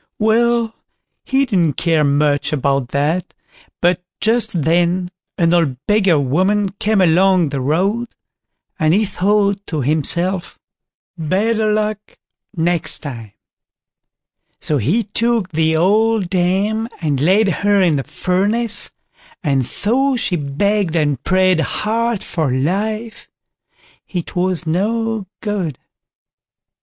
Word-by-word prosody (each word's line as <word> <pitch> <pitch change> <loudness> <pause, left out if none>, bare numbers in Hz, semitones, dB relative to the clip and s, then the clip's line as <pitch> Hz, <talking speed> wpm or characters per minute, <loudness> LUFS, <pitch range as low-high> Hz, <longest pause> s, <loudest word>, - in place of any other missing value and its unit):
Well, 230 +1 +2 0.5
he 270 +1 +2
didn't 180 - +1
care 165 +1 +1
much 145 0 +1
about 140 -3 0
that, 150 +7 -1 0.5
but 175 0 +2 0.2
just 220 -7 +1
then 175 +3 +1 0.3
an 170 0 +2
old 160 -7 +1
beggar 195 -7 +3
woman 190 +9 +1
came 215 -1 +2
along 180 -1 +3
the 140 -1 -3
road, 195 - 0 0.7
and 155 +2 +3
he 215 +2 +2
thought 200 +1 +1
to 155 -3 -2
himself, 170 +6 -1 0.6
"better 215 +7 +1
luck 210 0 -2 0.4
next 170 0 0
time"; 115 -8 -8 1.3
so 150 -2 0
he 200 - +1
took 230 -2 0
the 160 -1 +1
old 210 +3 +2
dame 195 +5 0
and 145 -5 -1
laid 195 +6 +3
her 205 0 +3
in 170 -6 +3
the 135 - -2
furnace, 205 - -1 0.5
and 140 -4 +1
though 255 - 0
she 220 -6 0
begged 175 +5 0
and 145 -5 0
prayed 185 -2 +3
hard 225 +5 -1
for 160 -5 -2
her 130 - 0
life, 215 - -2 0.8
it 175 -3 -5
was 180 -1 0
no 215 +5 -1
good. 195 - -3
185 Hz, 120 wpm, -18 LUFS, 160-215 Hz, 1.3 s, beggar